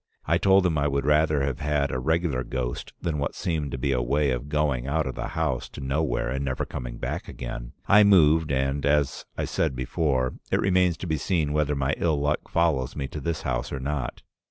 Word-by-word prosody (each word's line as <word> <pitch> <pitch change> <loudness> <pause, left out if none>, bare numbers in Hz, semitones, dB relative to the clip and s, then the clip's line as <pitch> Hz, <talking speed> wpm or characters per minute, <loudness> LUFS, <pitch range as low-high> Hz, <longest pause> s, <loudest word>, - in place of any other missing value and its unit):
I - - +2
told 95 -1 +5
him 80 -4 +2
I 70 - +2
would 70 -1 -1
rather 75 -1 +3
have 70 -2 -2
had 75 -2 0
a 65 - -1
regular 80 -2 0
ghost 60 -1 -4
than 80 -3 -1
what 70 - -2
seemed 80 -5 -2
to 65 - -4
be 70 +2 0
a 65 -2 +1
way 70 +3 +1
of 65 +3 -3
going 75 -4 0
out 80 +2 0
of 65 - -3
the - - -4
house - - -1
to - - -10
nowhere 65 -1 -1
and 70 +1 -2
never 65 -1 -2
coming - - -6
back - - -4
again. - - -7
I 105 +1 +7
moved, 80 -6 +5
and, 70 +1 0
as 70 -1 +1
I - - -1
said 75 -5 -1
before, 65 0 0 0.2
it - - +3
remains 90 -2 +2
to - - -6
be 80 -1 0
seen 75 -1 0
whether 75 -1 +1
my 70 +1 0
ill 80 -4 +1
luck 75 +1 -1
follows 75 -6 +1
me 70 -2 -3
to 75 - -6
this 80 +3 -2
house 65 -1 -2
or 70 - -3
not. 70 0 -3
70 Hz, 225 wpm, -26 LUFS, 65-80 Hz, 0.2 s, I